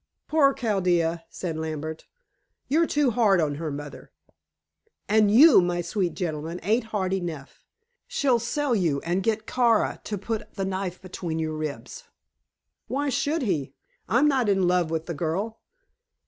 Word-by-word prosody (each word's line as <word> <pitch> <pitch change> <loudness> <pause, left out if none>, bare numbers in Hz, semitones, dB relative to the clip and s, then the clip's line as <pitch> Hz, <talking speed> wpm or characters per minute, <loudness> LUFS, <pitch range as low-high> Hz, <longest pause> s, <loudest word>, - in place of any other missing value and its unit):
"Poor 295 -3 +4
Chaldea," 175 -8 0
said 165 -4 -5
Lambert. 160 0 -5 0.6
"You're 320 +4 +2
too 290 -4 +2
hard 215 -5 +3
on 150 -3 +1
her, 160 - -2
mother." 145 0 -8 1.0
"And 215 0 +4
you, 255 - +8
my 175 0 -1
sweet 175 +1 -2
gentleman, 165 -1 -4
ain't 220 +5 +1
hard 195 -4 -2
enough. 170 -7 -5 0.4
She'll 285 - +2
sell 280 +3 -1
you, 165 -8 +1
and 175 +3 -1
get 220 +1 -1
Kara 235 -2 +2
to 210 - -3
put 220 +2 -5
the 195 - -2
knife 190 -1 -3
between 175 -3 -5
your 160 -1 -2
ribs." 155 - -6 0.8
"Why 285 +2 -1
should 290 +4 0
he? 145 - -2 0.3
I'm 255 +6 +4
not 260 -6 +2
in 190 -2 +2
love 180 -2 +2
with 160 0 -2
the 170 - -4
girl." 185 +9 -3
190 Hz, 150 wpm, -25 LUFS, 165-235 Hz, 1.0 s, you